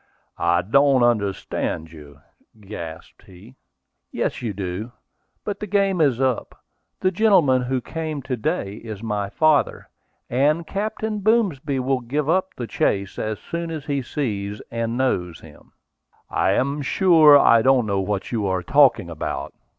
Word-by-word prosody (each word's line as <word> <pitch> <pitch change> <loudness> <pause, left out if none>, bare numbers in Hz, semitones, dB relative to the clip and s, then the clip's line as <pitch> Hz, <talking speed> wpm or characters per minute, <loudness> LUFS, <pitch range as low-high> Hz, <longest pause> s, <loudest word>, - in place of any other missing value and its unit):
"I 85 +1 +2
don't 135 +4 +3
understand 100 -7 -1
you," 75 -3 -14 0.4
gasped 85 -6 -9
he. 95 +6 -15 0.6
"Yes, - - -2
you 115 -3 -2
do. 100 +3 -5 0.5
But 205 -2 -4
the 210 - -5
game 195 -3 +1
is 135 -6 +2
up. 130 -3 -1 0.4
The 185 - +2
gentleman 180 - +3
who 125 +1 -2
came 155 -1 -5
to 130 0 -2
day 110 - -3
is 110 -2 -8
my 105 -3 -2
father, 155 +4 +1 0.4
and 150 +7 +1
Captain 215 +3 -3
Boomsby 190 - +1
will 130 0 0
give 140 +5 -2
up 185 +3 0
the 120 - -5
chase 100 -3 -1
as 110 -1 -2
soon 170 0 -5
as 155 -3 -6
he 140 -2 -1
sees 105 -7 -4
and 115 0 -2
knows 90 -10 -1
him." 75 -2 -16 0.6
"I - - +2
am 140 +3 0
sure 155 +1 +6
I 115 -4 +5
don't 130 -1 +3
know 100 -2 0
what 95 0 -3
you 110 -4 -1
are 95 -1 -1
talking 130 -5 +4
about." 85 -2 -5
125 Hz, 150 wpm, -22 LUFS, 100-155 Hz, 0.6 s, sure